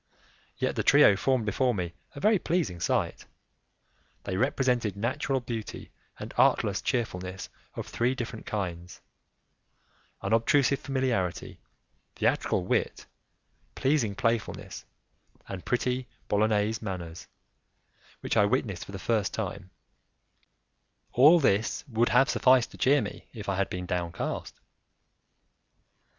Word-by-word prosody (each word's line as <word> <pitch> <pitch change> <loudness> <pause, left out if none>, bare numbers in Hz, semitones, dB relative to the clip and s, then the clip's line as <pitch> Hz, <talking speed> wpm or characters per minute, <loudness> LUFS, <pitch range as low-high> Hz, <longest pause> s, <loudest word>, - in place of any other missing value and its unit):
Yet - - -1
the - - 0
trio 100 - +6
formed 130 +2 +1
before 125 +3 +1
me 90 -3 -3 0.2
a - - -6
very 215 +4 +3
pleasing 165 - -1
sight; - - -1 1.0
they 95 - -3
represented 125 -3 +1
natural 130 +4 -1
beauty 115 -3 -6 0.3
and - - -8
artless - - +3
cheerfulness 95 -5 -3 0.3
of - - -4
three 125 +3 0
different 115 -2 -6
kinds; 90 -4 -4 1.2
unobtrusive 135 +4 +2
familiarity, 125 -10 -2 0.6
theatrical 90 - +1
wit, - - -1 0.7
pleasing 130 -7 +1
playfulness, 115 0 -2 0.6
and 95 -2 -7
pretty 125 +1 -1 0.2
Bolognese 105 +1 +1
manners 85 -5 -6 0.9
which - - -2
I 105 - +5
witnessed 105 -5 -1
for 100 - -11
the - - -4
first 105 0 0
time; 100 -3 -5 1.4
all 150 +7 +7
this 110 -6 +1
would 120 -1 +1
have 135 +2 +5
sufficed 130 -2 +4
to - - -12
cheer 140 +2 +4
me - - -8
if 110 -4 -8
I 100 - 0
had 100 - 0
been 90 0 -4
downcast. 85 -1 -3
110 Hz, 115 wpm, -28 LUFS, 95-130 Hz, 1.4 s, all